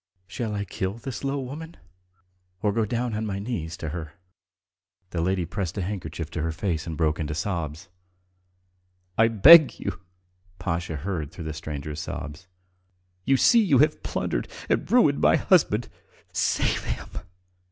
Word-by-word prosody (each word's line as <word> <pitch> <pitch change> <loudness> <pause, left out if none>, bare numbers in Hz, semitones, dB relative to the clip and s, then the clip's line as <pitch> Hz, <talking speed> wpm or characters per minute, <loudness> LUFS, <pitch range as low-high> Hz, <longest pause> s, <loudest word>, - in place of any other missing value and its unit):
Shall 105 +3 -4
I 100 0 -2
kill 95 +1 -3
this 115 +1 -7
low 140 +1 -1
woman 150 +6 -7 0.9
or 105 - +3
go 110 0 +1
down 120 +2 -2
on 105 +1 -2
my 100 -3 -3
knees 95 -7 -4
to 80 - -4
her?" 80 -2 -6 1.0
The 85 - -1
lady 90 0 0
pressed 90 0 -4
her 100 - -2
handkerchief 85 -4 -5
to 80 - -3
her 80 +1 -1
face 80 -1 -2
and 80 -2 -4
broke 80 -1 +1
into 75 -2 -2
sobs. 80 -3 -3 1.3
"I 110 - +5
beg 145 - +8
you!" 85 - -4 0.6
Pasha 85 -2 -2
heard 80 -1 -4
through 85 -1 -8
the 80 - -3
stranger's 75 0 -6
sobs. 75 +3 -6 0.8
"You 135 - +4
see 235 - +6
you 155 -10 +4
have 150 +3 +3
plundered - - -2 0.2
and - - 0
ruined 225 - +4
my - - +5
husband. 120 - +3 0.5
Save - - +1
him. - - -4
95 Hz, 155 wpm, -25 LUFS, 80-120 Hz, 1.3 s, beg